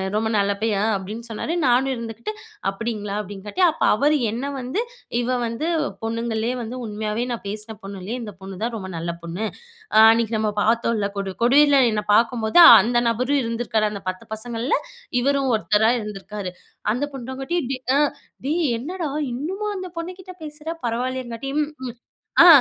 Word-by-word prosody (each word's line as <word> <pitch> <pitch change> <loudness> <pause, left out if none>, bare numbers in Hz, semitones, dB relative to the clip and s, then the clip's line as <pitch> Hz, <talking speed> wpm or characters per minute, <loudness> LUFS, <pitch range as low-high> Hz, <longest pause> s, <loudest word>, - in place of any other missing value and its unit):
ரொம்ப 220 +1 +1
நல்ல 200 0 +2
பையன் 210 -3 +1
அ - - +2
அப்டின்னு 215 +5 -7
சொன்னாரு 225 +8 -3
நானும் 255 +2 +3
இருந்துக்ட்டு 230 - -5 0.4
அப்டிங்களா 210 0 -4
அப்டின்னுகாட்டி, 205 - -5
அப்ப 310 - -15
அவரு 295 +6 +3
என்ன 240 +5 -3
வந்து 260 - -2 0.4
இவ 250 +1 0
வந்து 230 +7 -2 0.4
பொண்ணுங்கலேயே 230 +1 -1
வந்து 230 +2 -5
உண்மையாவே 215 +1 -2
நான் 235 - -4
பேசுன 215 +2 -4
பொண்ணுலேயே 195 +4 -5
இந்த 210 -3 -7
பொண்ணு 190 -1 -8
தான் 235 0 -1
ரொம்ப 190 -3 -6
நல்ல 170 +1 -2
பொண்ணு. 170 +6 -3 0.5
அ - - +6
அன்னைக்கு 230 0 +1
நம்ம 215 -1 +1
பார்த்தோல 225 -2 +1
கொடு 195 -1 -3
கொடிர்ல 285 +3 +6
என்னை 210 -1 -1
பாக்கும்போது 230 +3 +3 0.2
அந்த 240 +4 +2
நபரும் 255 +5 +1
இருந்திருக்காரு 230 -2 0
அந்த 200 -2 -7
10 185 0 -6
பசங்கள்ல 235 +3 -1 0.4
இவரும் 275 0 +2
1 215 0 +3
இருந்திருக்காரு. 210 -2 -6 0.4
அந்த 250 +5 -2
பொண்ணுங்கட்டியும் 265 +4 -3
டே - - -2 0.2
அ - - +4 0.5
டேய் 325 +5 +1 0.2
என்னடா 330 +4 -4 0.2
இன்னுமா 370 - -3
அந்த 370 -1 -5
பொண்ணுகிட்ட 370 +2 -7
பேசுற? 300 +1 -7 0.2
பரவாயில்லையேங்காட்டியும் 255 +4 -2 0.2
ம். 240 - -10 0.5
ஆ - - +10
230 Hz, 155 wpm, -23 LUFS, 215-265 Hz, 0.5 s, ஆ